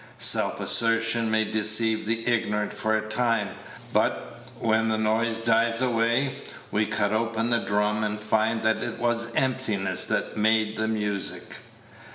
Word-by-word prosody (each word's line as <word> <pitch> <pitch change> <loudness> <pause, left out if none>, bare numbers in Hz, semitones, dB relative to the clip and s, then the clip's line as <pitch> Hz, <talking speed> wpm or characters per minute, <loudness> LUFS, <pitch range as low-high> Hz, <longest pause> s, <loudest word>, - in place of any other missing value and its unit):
Self - - +3
assertion 115 0 +2
may 110 0 +1
deceive 110 +1 +1
the 115 +1 -1
ignorant 105 -3 0
for 110 0 0
a 110 - -5
time, 115 -2 0 0.4
but, - - -1
when 110 0 +1
the 110 -1 0
noise 110 +1 0
dies 115 0 +2
away, 125 +2 0 0.3
we 105 +1 +1
cut 105 -1 0
open 115 +1 -1
the 120 - +3
drum, 105 +1 0
and 105 0 -2
find 110 +1 0
that 110 0 +1
it 120 - -4
was 120 0 -1
emptiness 125 -7 0
that - - -2
made 110 0 +1
the 110 0 -1
music. 105 -3 -2
110 Hz, 150 wpm, -25 LUFS, 110-115 Hz, 0.4 s, Self